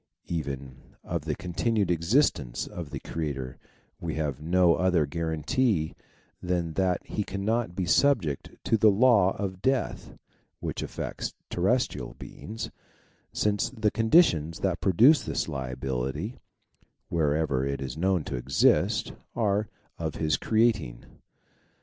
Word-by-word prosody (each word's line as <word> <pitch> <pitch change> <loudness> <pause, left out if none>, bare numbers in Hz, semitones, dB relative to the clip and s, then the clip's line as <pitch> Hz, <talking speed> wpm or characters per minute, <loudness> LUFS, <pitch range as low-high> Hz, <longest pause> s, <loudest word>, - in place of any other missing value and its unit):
Even 70 -5 -5
of 80 -3 -3
the 75 -2 -1
continued 100 +3 0
existence 85 - +1
of 85 -4 -7
the 70 -2 -5
Creator 70 -6 -4 0.4
we - - -4
have 75 -3 -2
no 85 +2 +4
other 90 -3 +2
guarantee 80 - 0 0.5
than 90 -2 -1
that 95 0 0
he 105 - -2
cannot 100 0 -1
be 95 -1 -1
subject 95 - +2
to 115 - +2
the 110 0 +6
law 105 -3 +4
of 95 -2 -4
death 130 -5 -1 0.4
which - - -4
affects - - -5 0.2
terrestrial - - 0
beings, 110 +1 -7 0.6
since 105 -1 0
the 110 -2 0
conditions 105 - +3
that 95 -2 0
produce 120 - +6
this - - -2
liability 65 - -3 0.7
wherever 75 -4 +1
it 70 0 -2
is 70 0 -5
known 90 0 +1
to - - -4
exist 60 +2 +2 0.2
are 105 -2 +1 0.3
of 80 -3 -3
his 80 0 +1
creating. 110 - +1
85 Hz, 125 wpm, -27 LUFS, 75-105 Hz, 0.7 s, the